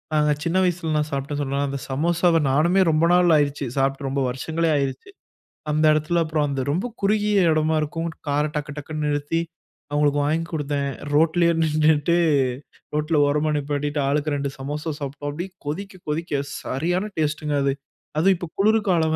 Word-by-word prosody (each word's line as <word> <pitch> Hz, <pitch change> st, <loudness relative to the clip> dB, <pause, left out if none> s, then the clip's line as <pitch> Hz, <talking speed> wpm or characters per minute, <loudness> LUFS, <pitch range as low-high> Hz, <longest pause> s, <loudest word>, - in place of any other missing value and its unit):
அ -, -, +3 dB, 0.3 s
சின்ன 170 Hz, +2 st, +1 dB
வயசுலலாம் 160 Hz, -4 st, 0 dB
சாப்ட்ட 140 Hz, +1 st, -3 dB
சொன்னல 140 Hz, 0 st, -1 dB
அந்த 140 Hz, 0 st, -4 dB
சமோசாவ 170 Hz, +4 st, +2 dB
நானுமே 170 Hz, +7 st, +3 dB
ரொம்ப 155 Hz, +2 st, +3 dB
நாள் 180 Hz, -1 st, +5 dB
ஆயிருச்சு. 145 Hz, -1 st, 0 dB
சாப்ட்டு 135 Hz, +1 st, 0 dB
ரொம்ப 135 Hz, +1 st, -1 dB
வருஷங்களே 160 Hz, +6 st, -1 dB
ஆயிருச்சு. 140 Hz, -, -3 dB, 0.6 s
அந்த 155 Hz, +1 st, +2 dB
எடத்தில 155 Hz, +3 st, +1 dB
அப்புறம் 155 Hz, -1 st, 0 dB
அந்த 135 Hz, -1 st, -2 dB
ரொம்ப 185 Hz, +10 st, -1 dB, 0.2 s
குறுகிய 210 Hz, 0 st, +2 dB
எடமா 155 Hz, 0 st, +2 dB
இருக்கும். 165 Hz, +3 st, -3 dB, 0.2 s
கார 145 Hz, +1 st, +1 dB
டக்கு 150 Hz, 0 st, -3 dB
டக்குன்னு 155 Hz, +1 st, -4 dB
நிறுத்தி, 145 Hz, +3 st, 0 dB, 0.5 s
அவுங்களுக்கு 145 Hz, 0 st, +2 dB
வாங்கி 160 Hz, +3 st, 0 dB
குடுத்தேன். 145 Hz, -2 st, -1 dB, 0.2 s
ரோட்லயே 165 Hz, +3 st, +3 dB
நின்னுட்டு, 155 Hz, +1 st, +3 dB, 0.8 s
ரோட்ல 150 Hz, +1 st, +1 dB
ஓரமா 150 Hz, +2 st, +1 dB
நிப்பாட்டிட்டு, 145 Hz, +1 st, -2 dB
ஆளுக்கு 145 Hz, +1 st, 0 dB
2 140 Hz, 0 st, -2 dB
சமோசா 150 Hz, +4 st, -4 dB
சாப்ட்டோம். 145 Hz, +1 st, -5 dB
அப்டியே 175 Hz, +6 st, -6 dB
கொதிக்க 185 Hz, +5 st, -5 dB
கொதிக்க 150 Hz, -2 st, -1 dB, 0.2 s
சரியான 175 Hz, +9 st, -1 dB
டேஸ்ட்டுங்க 150 Hz, -1 st, -1 dB
அது. 140 Hz, -1 st, +2 dB, 0.4 s
அதுவும் 185 Hz, +4 st, +4 dB
இப்ப 175 Hz, -2 st, -6 dB
குளிர் 215 Hz, +3 st, +4 dB
காலம் 160 Hz, -3 st, +2 dB
155 Hz, 155 wpm, -23 LUFS, 145-165 Hz, 0.8 s, நாள்